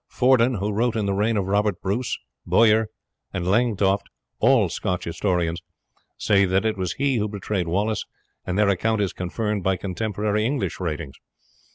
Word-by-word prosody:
Fordun, 125 Hz, -1 st, +3 dB
who 105 Hz, +1 st, -2 dB
wrote 115 Hz, +3 st, 0 dB
in 110 Hz, -2 st, 0 dB
the 100 Hz, -, 0 dB
reign 105 Hz, +3 st, +1 dB
of 100 Hz, -, 0 dB
Robert 100 Hz, -1 st, +1 dB
Bruce, 110 Hz, +6 st, -2 dB, 0.3 s
Bowyer, 110 Hz, -1 st, +4 dB, 0.4 s
and 90 Hz, -2 st, -3 dB
Langtoft, 100 Hz, -1 st, +2 dB, 0.3 s
all 120 Hz, -4 st, +4 dB
Scotch 90 Hz, +1 st, -3 dB
historians, 85 Hz, -1 st, -1 dB, 0.6 s
say 100 Hz, -1 st, +3 dB
that 95 Hz, +3 st, +1 dB
it 110 Hz, -1 st, +1 dB
was 95 Hz, -3 st, -2 dB
he 135 Hz, -2 st, 0 dB
who 105 Hz, -1 st, 0 dB
betrayed 100 Hz, -3 st, -3 dB
Wallace, 105 Hz, +5 st, 0 dB, 0.4 s
and 90 Hz, +1 st, -3 dB
their 105 Hz, -1 st, +4 dB
account 110 Hz, +3 st, +1 dB
is 100 Hz, -3 st, 0 dB
confirmed 105 Hz, +3 st, -2 dB
by 95 Hz, +1 st, +2 dB
contemporary 105 Hz, +2 st, -2 dB
English 135 Hz, +4 st, -1 dB
writings. 75 Hz, -5 st, -4 dB
105 Hz, 165 wpm, -23 LUFS, 95-110 Hz, 0.6 s, Bowyer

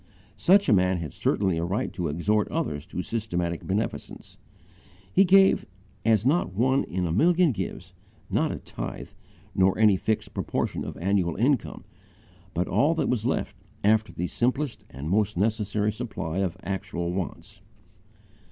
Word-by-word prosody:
Such 200 Hz, +3 st, +4 dB
a -, -, +5 dB
man 95 Hz, -1 st, +3 dB
had 80 Hz, -5 st, -5 dB
certainly 95 Hz, -5 st, 0 dB
a -, -, -1 dB
right 95 Hz, +5 st, -2 dB
to 90 Hz, -3 st, -2 dB
exhort 100 Hz, +8 st, +1 dB
others 90 Hz, -, -3 dB
to 90 Hz, -1 st, -4 dB
systematic 90 Hz, -7 st, -3 dB
beneficence. 105 Hz, +4 st, -4 dB, 0.7 s
He 195 Hz, -, +6 dB
gave 195 Hz, +1 st, +5 dB, 0.4 s
as 110 Hz, 0 st, +3 dB
not 140 Hz, -, +1 dB
one 130 Hz, +5 st, +2 dB
in 90 Hz, 0 st, -2 dB
a 85 Hz, -, -1 dB
million 170 Hz, -, +4 dB
gives 115 Hz, -, -5 dB, 0.3 s
not -, -, +1 dB
a -, -, -4 dB
tithe, -, -, -7 dB, 0.4 s
not 95 Hz, 0 st, +4 dB
any 105 Hz, -3 st, +5 dB
fixed 110 Hz, +3 st, -2 dB
proportion -, -, -2 dB
of -, -, -6 dB
annual 90 Hz, -2 st, +1 dB
income, 125 Hz, +3 st, 0 dB, 0.7 s
but 90 Hz, -, 0 dB
all 155 Hz, +4 st, +2 dB
that -, -, 0 dB
was 120 Hz, -2 st, 0 dB
left 105 Hz, -6 st, -1 dB, 0.3 s
after 110 Hz, +1 st, +3 dB
the 90 Hz, -, -3 dB
simplest 125 Hz, +7 st, -1 dB
and 70 Hz, +4 st, -7 dB
most 100 Hz, +1 st, +1 dB
necessary 105 Hz, 0 st, 0 dB
supply 105 Hz, -7 st, -4 dB
of 95 Hz, -4 st, -1 dB
actual 85 Hz, -3 st, -3 dB
wants. 90 Hz, -3 st, -5 dB
105 Hz, 150 wpm, -26 LUFS, 90-120 Hz, 0.7 s, He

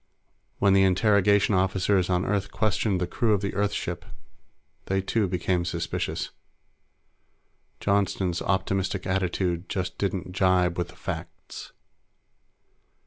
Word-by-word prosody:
When 100 Hz, -1 st, +4 dB
the 95 Hz, -, +5 dB
interrogation 100 Hz, +2 st, +3 dB
officers 95 Hz, 0 st, +2 dB
on 90 Hz, 0 st, +1 dB
Earth 100 Hz, -1 st, -1 dB
questioned 105 Hz, -2 st, 0 dB
the 90 Hz, -, 0 dB
crew 110 Hz, +5 st, +1 dB
of 100 Hz, -, +1 dB
the 100 Hz, -2 st, -2 dB
Earth 100 Hz, +1 st, 0 dB
ship, 90 Hz, -4 st, -4 dB, 0.8 s
they, 95 Hz, 0 st, +1 dB
too, 100 Hz, +2 st, 0 dB
became 90 Hz, 0 st, 0 dB
suspicious. 85 Hz, -1 st, -3 dB, 1.5 s
Johnston's 100 Hz, -3 st, 0 dB
optimistic 95 Hz, 0 st, -1 dB
attitude 90 Hz, -1 st, -1 dB
just 95 Hz, 0 st, -3 dB
didn't 95 Hz, -2 st, -2 dB
jibe 90 Hz, -2 st, +2 dB
with 90 Hz, 0 st, -2 dB
the -, -, -15 dB
facts. -, -, -7 dB
95 Hz, 120 wpm, -26 LUFS, 90-100 Hz, 1.5 s, the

